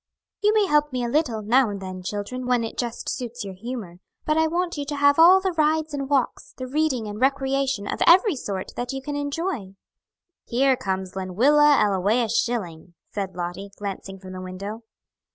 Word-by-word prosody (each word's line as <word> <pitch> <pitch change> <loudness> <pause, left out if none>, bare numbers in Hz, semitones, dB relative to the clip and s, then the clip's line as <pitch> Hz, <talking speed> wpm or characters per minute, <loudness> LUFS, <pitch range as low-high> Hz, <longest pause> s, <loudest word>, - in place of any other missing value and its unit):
"You 420 0 +4
may 425 -2 +4
help 300 -3 +2
me 250 -1 -2
a - - -2
little, 240 -6 0
now 240 +3 +3
and 200 -1 -5
then, 185 -1 -7
children, 210 +7 -4
when 245 -2 +2
it 225 - -5
just 240 -1 -4
suits 245 -2 -4
your 195 - -6
humor, 205 -3 -7 0.3
but 305 - +1
I 320 0 +3
want 345 +2 -1
you 290 - -3
to 290 +1 -4
have 285 +1 +4
all 360 +3 +8
the 380 0 -1
rides 310 -1 +1
and 275 -1 -3
walks, 275 -3 -1
the 255 - -5
reading 265 -3 0
and 210 +2 -6
recreation 270 -3 +1
of - - -4
every 370 +1 +6
sort 200 -7 -5
that 245 +2 -3
you 270 - -4
can 290 +1 -4
enjoy." 285 - -3 0.7
"Here 265 +2 +2
comes 190 -5 -4
Lenwilla 275 +11 +4
Ellawea 210 +4 +2
Schilling," 180 -8 -2 0.2
said 195 -3 -4
Lottie, 180 +3 -5
glancing 195 -1 -6
from 185 -1 -10
the 185 - -6
window. 200 +4 -6
245 Hz, 190 wpm, -24 LUFS, 200-290 Hz, 0.7 s, all